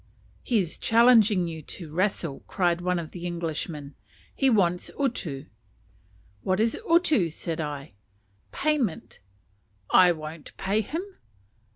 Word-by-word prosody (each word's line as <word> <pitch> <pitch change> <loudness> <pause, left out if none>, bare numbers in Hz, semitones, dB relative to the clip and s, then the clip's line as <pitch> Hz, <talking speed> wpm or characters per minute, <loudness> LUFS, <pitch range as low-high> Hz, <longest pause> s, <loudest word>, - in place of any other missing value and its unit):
"He 240 - +1
is 180 -6 -1
challenging 225 -5 +5
you 160 -1 -6
to 155 +1 -9
wrestle," 175 -5 0
cried 175 -2 +1
one 180 0 0
of 165 -2 -5
the 175 -1 -6
Englishmen; 160 -4 -4 0.4
"he 270 - +2
wants 180 -6 +2
utu." 170 - -2 1.0
"What 185 +1 0
is 225 +1 +2
utu" 315 - +4
said 165 +1 -4
I. 145 -6 -5 0.6
"Payment." 280 - -1 0.7
"I 180 -1 +7
won't 155 -1 -8
pay 200 +3 +1
him." 325 - -4
180 Hz, 125 wpm, -26 LUFS, 160-220 Hz, 1.0 s, I